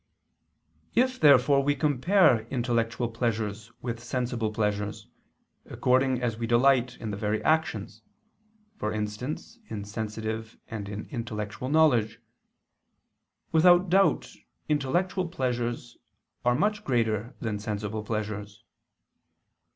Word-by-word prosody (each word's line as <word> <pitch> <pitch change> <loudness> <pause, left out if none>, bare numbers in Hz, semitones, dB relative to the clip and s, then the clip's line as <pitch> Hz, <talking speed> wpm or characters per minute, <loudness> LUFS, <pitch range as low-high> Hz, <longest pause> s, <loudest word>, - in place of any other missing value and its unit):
If 255 +1 +2
therefore 140 -1 +6
we 145 +1 +1
compare 145 - +3
intellectual 120 -2 0
pleasures 110 -2 -3
with 120 -1 -4
sensible 120 -3 -2
pleasures, 105 -1 -2 0.6
according 130 0 +1
as 115 -2 -1
we 115 - -2
delight 125 +1 +3
in 110 -2 -5
the 100 - -4
very 105 +1 0
actions, 110 -9 0 0.8
for 105 - -2
instance 110 - -4
in 100 -2 -5
sensitive 110 +1 -5
and 105 -3 -6
in 105 +1 -5
intellectual 115 -1 -4
knowledge; 140 -8 +3 1.3
without 175 +2 +5
doubt 195 +1 +3 0.3
intellectual 175 +6 0
pleasures 120 -6 -3 0.5
are 125 0 +3
much 210 +7 0
greater 115 - 0
than 105 -3 -3
sensible 105 0 -3
pleasures. 105 -1 -4
120 Hz, 105 wpm, -27 LUFS, 110-140 Hz, 1.3 s, therefore